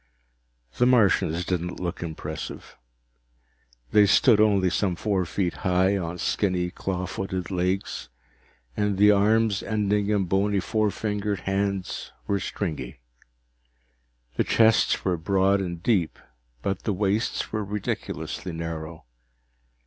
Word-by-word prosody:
The 125 - +5
Martians 95 -8 +3
didn't 90 -1 -2
look 90 -1 -4
impressive. 80 -2 -6 1.2
They 105 -1 +6
stood 110 +1 +5
only 100 -4 +3
some 95 -1 0
four 95 -1 0
feet 90 0 -2
high 95 +2 +2
on 90 -2 -3
skinny, 90 -1 0
claw 90 -1 -3
footed 95 0 -4
legs, 90 -9 -2 0.7
and 105 -2 0
the 105 +1 +6
arms, 105 0 +3
ending 105 -1 0
in 105 -2 +2
bony 100 +2 +1
four 110 +2 0
fingered 105 -2 -2
hands, 95 -1 -2
were 100 - 0
stringy. 75 -11 -4 1.4
The - - +3
chests 110 -1 +3
were 90 -2 +1
broad 95 +3 +2
and 85 -2 -5
deep, 95 -9 +1 0.5
but 95 -1 -2
the 105 - -1
waists 100 +3 -1
were 110 -1 -1
ridiculously 100 -2 -4
narrow. 80 -1 -6
95 Hz, 120 wpm, -25 LUFS, 90-105 Hz, 1.4 s, They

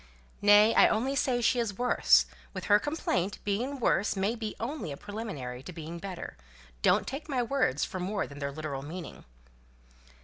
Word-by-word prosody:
"Nay, 210 +2 +7
I - - +7
only 255 +5 0
say 250 -3 +1
she 245 +2 +3
is 210 -5 -2
worse. 245 0 +4 0.3
With - - -4
her 205 0 +5
complaint, 205 - -1
being 245 +8 -2
worse 210 -3 +2
may 195 +3 0
be 220 -3 -5
only 240 - -4
a 140 - -6
preliminary 150 - -6
to 165 - -9
being 165 0 -7
better. 185 - -7 0.4
Don't - - +3
take 290 +4 -6
my 255 -3 +1
words 235 - +1
for 185 - -6
more 195 +3 -1
than 140 0 -11
their 140 -1 -3
literal 145 -2 -5
meaning." 165 +4 -8
205 Hz, 175 wpm, -29 LUFS, 165-245 Hz, 0.4 s, Nay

